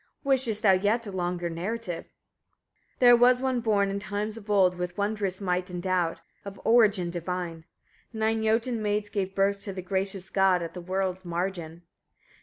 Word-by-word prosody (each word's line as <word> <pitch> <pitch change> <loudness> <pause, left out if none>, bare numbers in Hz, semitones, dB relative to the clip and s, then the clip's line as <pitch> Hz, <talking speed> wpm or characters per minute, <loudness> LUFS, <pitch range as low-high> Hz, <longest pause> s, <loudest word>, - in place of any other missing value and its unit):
Wishest 255 -6 +1
thou 200 - +6
yet 205 +5 +2
a 200 - -6
longer 175 -1 -2
narrative? 175 +2 -4 0.9
35. - - -41
There 245 -1 +8
was 245 +1 +5
one 260 -1 0
born, 205 -3 +2
in 200 - -2
times 210 +1 -3
of 220 -2 -12
old, 190 -3 +4
with 180 0 -4
wondrous 205 -2 -1
might 180 -1 -1
endowed, 180 -1 -1 0.2
of 200 -1 -9
origin 210 -7 +4
divine: 175 -1 -4 0.5
nine 220 0 0
Jotun 225 +1 +1
maids 205 0 -1
gave 195 -2 -3
birth 200 0 +1
to 200 - -5
the 185 -1 -6
gracious 190 0 -3
god, 190 -2 +3
at 165 - -6
the 180 - -7
world's 185 +1 -2
margin. 175 -1 -4
195 Hz, 170 wpm, -27 LUFS, 180-215 Hz, 0.9 s, There